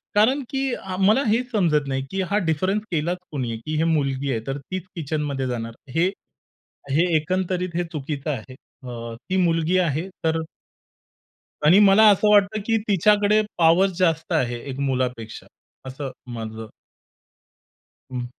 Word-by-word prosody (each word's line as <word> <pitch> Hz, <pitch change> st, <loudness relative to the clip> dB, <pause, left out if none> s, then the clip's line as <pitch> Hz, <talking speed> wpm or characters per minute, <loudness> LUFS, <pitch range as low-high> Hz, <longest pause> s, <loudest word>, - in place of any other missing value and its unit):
कारण, 245 Hz, +7 st, +4 dB
की 270 Hz, -1 st, -1 dB, 0.3 s
मला 215 Hz, +8 st, +4 dB
हेच 245 Hz, +4 st, +1 dB
समजत 160 Hz, -, +2 dB
नाही, 135 Hz, 0 st, -2 dB
की 195 Hz, -, -1 dB
हा 205 Hz, -, +3 dB
डिफरन्स 185 Hz, +7 st, 0 dB
केलाच 170 Hz, +2 st, 0 dB
कुणी? 125 Hz, -6 st, -3 dB
की 155 Hz, -, -3 dB
ही 160 Hz, -, +2 dB
मुलगी 140 Hz, -4 st, 0 dB
आहे 115 Hz, -, 0 dB
तर 135 Hz, +1 st, -2 dB
तीच 185 Hz, +6 st, -6 dB
किचनमध्ये 145 Hz, -4 st, -2 dB
जाणार. 115 Hz, -2 st, -4 dB, 0.2 s
हे 175 Hz, +3 st, +3 dB, 0.8 s
हे 155 Hz, +5 st, +3 dB
एकंदरीत 185 Hz, +2 st, -1 dB
हे 175 Hz, -, +1 dB
चुकीचं 150 Hz, -1 st, -4 dB
आहे. 130 Hz, -1 st, -6 dB, 0.3 s
अ, 115 Hz, -2 st, -7 dB
ती 185 Hz, -, +1 dB
मुलगी 170 Hz, 0 st, +2 dB
आहे 165 Hz, 0 st, 0 dB, 0.2 s
तर 160 Hz, 0 st, +2 dB, 1.3 s
आणि 175 Hz, +7 st, +7 dB
मला 205 Hz, +1 st, +7 dB
असं 210 Hz, +1 st, +4 dB
वाटतं, 205 Hz, +1 st, +4 dB
की 225 Hz, 0 st, +2 dB
तिच्याकडे 210 Hz, +2 st, +4 dB, 0.2 s
पॉवर 170 Hz, +3 st, +5 dB
जास्त 165 Hz, -1 st, +1 dB
आहे 120 Hz, -6 st, 0 dB
एक 135 Hz, 0 st, -6 dB
मुलापेक्षा 125 Hz, -4 st, -2 dB, 0.4 s
असं 135 Hz, +1 st, -5 dB, 0.2 s
माझं 110 Hz, -1 st, -6 dB, 1.4 s
हं. 125 Hz, -1 st, -3 dB
160 Hz, 145 wpm, -23 LUFS, 135-195 Hz, 1.4 s, आणि